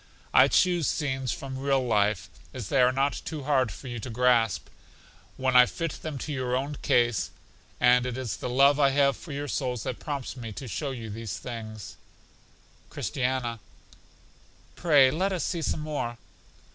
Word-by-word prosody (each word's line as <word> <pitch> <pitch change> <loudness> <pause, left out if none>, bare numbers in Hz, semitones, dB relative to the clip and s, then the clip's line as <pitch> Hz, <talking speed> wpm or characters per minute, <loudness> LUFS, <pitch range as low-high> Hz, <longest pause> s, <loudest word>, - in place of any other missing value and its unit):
I - - +7
choose 175 -4 +3
scenes 130 -4 -1
from 135 -1 -5
real 135 -1 +1
life, 105 -2 +1 0.3
as 120 -6 -5
they 135 - +3
are 125 0 +5
not 135 +2 0
too 155 -3 -5
hard 130 -5 +2
for 130 - -10
you 120 -2 -5
to 120 - -6
grasp, 120 -3 +2 0.7
when 130 -1 0
I 125 0 +8
fit 165 -2 -4
them 155 -3 -5
to 150 +3 -4
your 130 -2 -1
own 140 +3 -2
case; 120 -3 +2 0.5
and 125 0 +5
it 125 0 -4
is 130 -4 -3
the - - -4
love 140 +3 +5
I 140 -1 +5
have 140 0 +3
for 165 - -11
your 145 +1 -4
souls 125 -6 -2
that 125 - -4
prompts 140 -4 -4
me 115 -4 -7
to 130 - -7
show 140 +5 -3
you 115 -5 -6
these 110 -3 -5
things. 110 -4 -8 0.9
Christiana: 125 -3 -2 1.2
Pray 145 -6 +5
let 185 +7 0
us 185 -3 -1
see 170 -2 -2
some 155 - -1
more. 145 -6 -3
130 Hz, 175 wpm, -27 LUFS, 120-140 Hz, 1.2 s, I